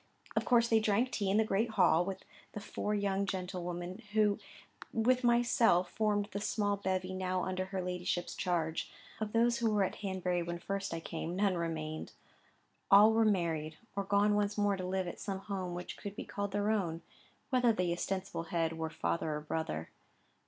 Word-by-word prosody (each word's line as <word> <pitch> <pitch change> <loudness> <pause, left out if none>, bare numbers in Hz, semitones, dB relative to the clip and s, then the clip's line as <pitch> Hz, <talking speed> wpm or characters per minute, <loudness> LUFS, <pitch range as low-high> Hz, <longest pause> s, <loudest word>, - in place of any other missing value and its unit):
Of - - +1
course 235 -1 +4
they 225 -1 +4
drank 220 +4 +2
tea 200 -3 -1
in 200 - +3
the 220 - +5
great 215 +2 +1
hall, 175 -2 +5
with 190 +1 -5 0.3
the - - -4
four 210 0 -2
young 200 -1 0
gentlewomen, 180 0 -4
who, 210 -2 +3 0.5
with 250 +3 +2
myself, 235 -7 +4
formed 210 -1 +1
the 200 - -3
small 205 -1 +1
bevy 185 -1 -2
now 185 -1 -1
under 185 0 -2
her 190 -1 -3
ladyship's 180 -1 -2
charge. 165 -3 -1 0.3
Of 215 -1 -2
those 235 +1 +3
who 230 -1 +2
were 205 -2 +3
at 190 - -2
Hanbury 185 -3 -1
when 170 0 -3
first 195 +3 -3
I 165 0 -3
came, 165 +1 -4
none 200 0 +2
remained; 160 -2 -3 0.8
all 210 +2 +8
were 225 0 +4
married, 165 -6 0 0.2
or 200 - 0
gone 200 +1 +3
once 205 0 +1
more 205 -1 +2
to 185 - -5
live 185 0 -1
at 175 - -6
some 195 -2 -3
home 190 -3 -4
which 180 0 -6
could 205 0 -7
be - - -6
called 200 -1 -3
their 205 +2 +1
own, 175 -6 -1 0.5
whether 250 -2 +4
the 180 -5 0
ostensible 185 -1 -3
head 165 -1 0
were 160 0 -1
father 160 -1 -1
or 150 - -4
brother. 150 - -3
195 Hz, 190 wpm, -33 LUFS, 175-210 Hz, 0.8 s, all